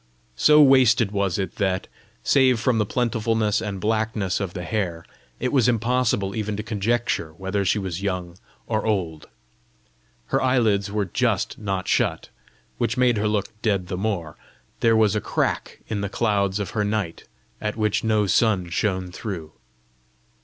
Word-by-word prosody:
So 150 - +6
wasted 125 -6 +5
was 100 -3 0
it 95 -2 -4
that, 95 -2 0 0.4
save 130 -4 +4
from 120 -1 +1
the 105 - +1
plentifulness 115 -3 0
and 100 -3 -4
blackness 110 -2 0
of 95 -3 -4
the 90 - -4
hair, 85 -4 -3 0.3
it 125 +2 -1
was 125 -4 +4
impossible 115 -4 +1
even 105 -2 -2
to 105 - -4
conjecture 110 -5 -1
whether 95 +3 -2
she 100 - +2
was 95 -3 -4
young 90 -3 -3 0.3
or 110 -1 -1
old. 90 -8 -2 1.1
Her - - +3
eyelids 110 -6 +2
were 105 -1 0
just 90 - -1
not 95 -3 -3
shut, - - 0 0.5
which 115 - 0
made 125 -2 +3
her 105 +1 +1
look 105 -2 0
dead 100 -5 0
the 95 - -2
more: 90 -7 -3 0.4
there 115 -1 +4
was 110 -2 +3
a 105 - 0
crack - - -2
in 105 -2 -2
the 100 - -2
clouds 100 -2 0
of 100 -3 -3
her 105 - 0
night, 105 -5 -2 0.4
at 105 0 -3
which 105 -2 0
no 110 -2 +2
sun 95 -2 +2
shone 95 -1 -1
through! 90 -6 -6
105 Hz, 160 wpm, -23 LUFS, 95-115 Hz, 1.1 s, So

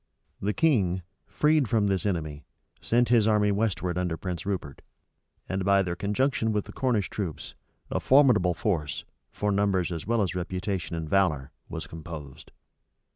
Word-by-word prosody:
The 100 - +1
king, 95 - +2 0.2
freed 150 -5 +2
from 110 -3 +2
this 100 0 0
enemy, 75 -6 -3 0.4
sent 120 0 +2
his 115 -3 +4
army 105 -1 +3
westward 95 -4 0
under 90 -3 -1
Prince 90 0 -5
Rupert; 85 -8 -4 0.7
and, 95 0 -2
by 100 0 +4
their 90 -2 -3
conjunction 110 +4 0
with 105 -2 -1
the - - -10
Cornish 120 -8 +1
troops, 95 -7 -5 0.4
a - - 0
formidable 125 -11 +4
force, 80 -9 -2 0.3
for 105 0 -1
numbers 100 -3 +1
as 85 +1 -5
well 115 -2 +2
as 95 - -2
reputation 90 -1 -3
and 80 -1 -4
valor, 75 -7 +1 0.2
was - - -5
composed. 80 -4 -9
95 Hz, 155 wpm, -27 LUFS, 85-105 Hz, 0.7 s, his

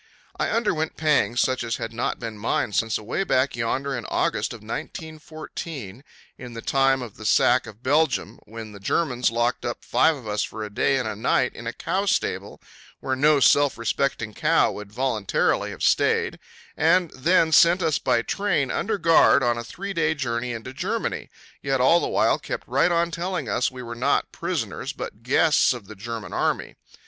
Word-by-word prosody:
I - - -1
underwent 180 -9 -1
pangs 150 -6 +2
such 130 -1 0
as 115 -1 -2
had 115 - -5
not 120 - -2
been 115 -2 -6
mine 105 0 -1
since 110 +1 +1
away 110 - -2
back 130 -7 +1
yonder 135 +4 -2
in 120 - -5
August - - 0
of - - -9
1914, 155 - -7 0.4
in 125 -2 -9
the 115 - -7
time 135 -1 +2
of 115 -4 -10
the 110 - -10
sack 125 - +3
of 110 +3 -13
Belgium, 150 +4 +1
when 110 0 -9
the 100 - -11
Germans 125 +3 0
locked 120 +2 -1
up 120 - -5
five 160 0 +3
of 125 -6 -11
us 105 0 -1
for 110 0 -4
a 105 - -7
day 135 - +2
and 125 -4 -2
a 110 - -3
night 125 +3 +1
in 115 - -8
a - - -1
cow 190 - -2
stable - - -1 0.4
where 130 - -2
no 145 +2 +4
self 145 +1 +4
respecting 115 -1 -1
cow - - +2
would 105 -1 -9
voluntarily 115 -4 0
have - - -7
stayed, - - +2 0.4
and, 180 -3 +3
then 160 +4 +2
sent 170 +3 +5
us 155 -3 +1
by 120 -1 +1
train 195 -8 0
under 215 0 -1
guard 165 -5 +5
on 120 -1 +2
a - - -5
three 195 - -6
day 160 -3 +1
journey 125 -3 -2
into 115 +3 -7
Germany, - - -3 0.3
yet 135 -1 0
all 150 +7 +5
the - - -2
while - - +2
kept - - -6
right - - +2
on 170 0 +1
telling 180 +2 -3
us 125 - +1
we 130 -1 -9
were 120 0 -6
not 120 +2 0
prisoners - - -3
but 105 - -7
guests 135 +4 +3
of 120 -5 -9
the 110 - -10
German 115 +1 -6
Army. - - -1
130 Hz, 190 wpm, -24 LUFS, 115-160 Hz, 0.4 s, sent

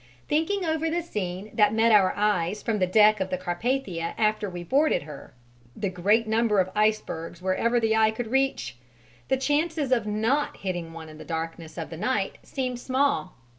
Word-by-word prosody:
Thinking 335 +6 0
over 320 0 0
the 340 +1 -1
scene 200 - -5
that 210 0 +3
met 225 +1 +4
our 200 -3 +5
eyes 205 -2 0
from 220 -3 0
the 185 - +2
deck 210 +2 +5
of 190 0 -2
the 185 - -1
Carpathia 180 -1 -2
after 215 -1 +1
we 175 -1 -6
boarded 280 - +2
her, 150 -3 -11 0.4
the 200 -3 -2
great 205 +6 +2
number 220 -1 +2
of 185 0 +1
icebergs 210 -6 -1
wherever 190 +6 +1
the 220 -1 +2
eye 220 0 +4
could 220 +1 -5
reach, 265 - 0 0.5
the 265 - +2
chances 295 +1 0
of 235 -4 +2
not 225 +8 0
hitting 175 -4 -4
one 165 -1 -9
in 155 0 -12
the - - -8
darkness 165 0 -5
of 165 - -5
the 165 - -6
night 200 0 -1
seemed 255 -3 -4
small. 260 -6 0
215 Hz, 185 wpm, -26 LUFS, 180-255 Hz, 0.5 s, our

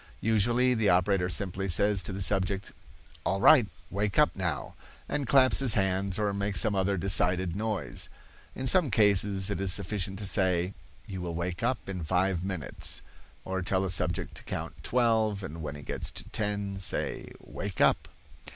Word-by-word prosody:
Usually 120 +4 +2
the 110 -3 +1
operator 90 +1 +2
simply 95 +1 -1
says 100 +3 +3
to 90 - -5
the 95 0 -2
subject, 95 0 0 0.5
"All 95 - 0
right, 120 +1 +6 0.2
wake 100 0 -2
up 150 - +3
now," 90 -4 -3 0.3
and 140 -3 -3
claps 135 -3 +5
his 135 -4 +3
hands 95 -1 0
or 105 -1 -1
makes 100 -2 0
some 110 - +1
other 95 0 0
decided 90 -1 +3
noise. 105 -6 -3 0.5
In 130 - -5
some 160 +2 +4
cases 100 -2 +3
it 100 - -3
is 95 -1 +3
sufficient 95 +1 +1
to 105 - -4
say, 95 -2 0 0.3
"You 95 -4 -7
will 85 -1 -5
wake 85 +1 -4
up 125 +3 -2
in 90 -3 -5
five 90 +2 0
minutes"; 90 -8 -3 0.4
or 95 0 -3
tell 95 +2 0
a 95 - -1
subject 85 -1 0
to - - -8
count - - -6
twelve 110 -4 +1
and 80 -2 -7
when 75 -1 -5
he 75 - -10
gets - - -2
to - - -6
ten 100 -2 -3
say, 95 - -2
"Wake 100 -3 -7
up." - - +3
95 Hz, 175 wpm, -28 LUFS, 90-105 Hz, 0.5 s, right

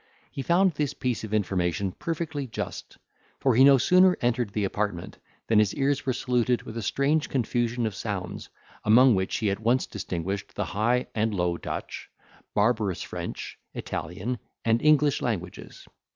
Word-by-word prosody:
He 140 - -5
found 180 +6 +3
this 150 -3 -2
piece 125 -4 -2
of 110 - -6
information 95 -2 0
perfectly 155 - -4
just; 110 - -6 0.4
for 130 - +3
he 125 +4 +6
no 140 0 +8
sooner 180 +6 +5
entered 120 -3 0
the 105 +1 -2
apartment, 100 -3 -3 0.3
than 110 -2 +4
his 105 -2 +2
ears 140 +1 0
were 130 - +2
saluted 125 -1 0
with 110 - -9
a 115 - -3
strange 140 +7 +1
confusion 120 -1 0
of 110 - -2
sounds, 95 -3 -5 0.3
among 125 +4 +6
which 95 -1 0
he 105 -4 0
at 100 - -3
once 120 +4 +2
distinguished 95 0 -4
the - - -1
High 120 +5 +1
and 110 -1 0
Low 90 -2 0
Dutch, - - -6 0.5
barbarous 105 -3 +1
French, - - -6 0.2
Italian, 105 +9 -4 0.3
and 115 0 +3
English 150 -1 +4
languages. 95 -8 -5
115 Hz, 160 wpm, -26 LUFS, 100-135 Hz, 0.5 s, no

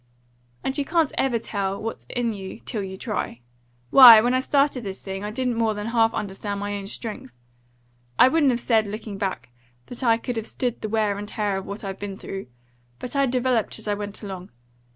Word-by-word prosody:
"And 265 - -2
you - - +1
can't 320 0 +1
ever 260 -3 +1
tell 200 -3 -3
what's 225 +1 -6
in 240 -2 -1
you 195 +1 -8
till 220 -5 -3
you 190 -1 -6
try. 205 - -4 0.5
Why, 245 -5 +11
when 245 +3 +2
I 255 - +3
started 275 -1 +1
this 195 -2 -6
thing, 195 0 -5
I 210 - -3
didn't 245 +1 -1
more 220 -2 +1
than 210 0 -4
half 225 -1 +3
understand 200 0 -4
my 205 0 -3
own 200 -1 -6
strength. 215 - -7 0.8
I - - +8
wouldn't 290 0 +3
have 240 -2 +1
said, 225 -3 +2
looking 210 -1 -6
back, 185 - -3 0.4
that 245 - -9
I 230 -3 +4
could 240 0 -4
have 225 - -3
stood 245 -3 -2
the 215 - -3
wear 210 -2 0
and 205 - -6
tear 205 -2 -1
of 195 - -6
what 200 +2 -6
I've 195 -1 -5
been 200 -1 -5
through. 195 0 -7 0.5
But 250 - -6
I 275 -1 +3
developed 250 -3 0
as 220 - -9
I 205 - +1
went 205 +1 -5
along. 190 -2 -7
215 Hz, 215 wpm, -24 LUFS, 200-245 Hz, 0.8 s, Why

